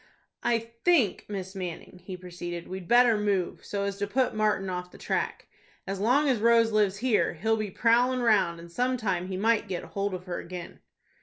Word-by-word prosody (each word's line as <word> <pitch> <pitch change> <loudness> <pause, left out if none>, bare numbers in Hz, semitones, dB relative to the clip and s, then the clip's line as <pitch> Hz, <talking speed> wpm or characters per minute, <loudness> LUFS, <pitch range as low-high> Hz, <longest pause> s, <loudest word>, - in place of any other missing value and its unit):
"I 240 -1 +2 0.3
think, 290 - +3
Miss 190 -2 -5
Manning," 180 -1 -7
he 185 0 -7
proceeded, 175 -1 -7
"we'd 185 -1 -7
better 240 -2 +5
move, 200 -4 -1
so 200 -1 -3
as 200 0 -2
to 205 0 -2
put 255 +5 +1
Martin 215 -3 +1
off 180 -1 -4
the - - -15
track. - - -2 0.4
As 195 0 -4
long 255 +8 +3
as 255 -5 +2
Rose 230 0 +4
lives 205 -2 +2
here, 235 -1 +1
he'll 220 +7 +1
be 215 -2 -3
prowling 245 +5 +2
round, 205 -8 +3
and 170 0 -12
some 250 +6 0
time 190 -6 -1
he 185 -1 -4
might 220 +1 +2
get 185 -3 -4
hold 200 -1 -3
of 180 - -7
her 180 -2 -4
again." 175 -1 -8
200 Hz, 200 wpm, -28 LUFS, 185-230 Hz, 0.4 s, better